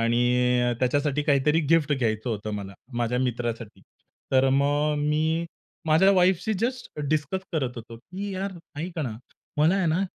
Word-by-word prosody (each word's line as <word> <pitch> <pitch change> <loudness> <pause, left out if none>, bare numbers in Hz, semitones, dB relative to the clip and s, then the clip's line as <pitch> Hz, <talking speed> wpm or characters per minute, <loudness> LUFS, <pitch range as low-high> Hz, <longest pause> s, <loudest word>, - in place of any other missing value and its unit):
आणि 125 +1 +2
त्याच्यासाठी 145 +3 +1
काहीतरी 145 +2 +3
गिफ्ट 160 -3 +4
घ्यायचं 115 -3 -1
होतं 110 -1 -3
मला 100 -1 -6 0.3
माझ्या 120 +1 0
मित्रासाठी, 120 -4 -3 0.5
तर 135 0 +4
मग 145 +2 +2
मी 155 +3 +1 0.4
माझ्या 160 +5 +5
वाईफशी 185 +3 +3
जस्ट 250 -6 -3
डिस्कस 155 +4 0
करत 135 -7 -1
होतो, 115 0 -9
की 190 - -7
"यार 195 +1 -3 0.3
ऐक 175 +1 -5
ना, 125 -8 -3 0.4
मला 155 +5 +4
आहे 195 -3 +1
ना 165 +3 +1
145 Hz, 150 wpm, -26 LUFS, 120-165 Hz, 0.5 s, माझ्या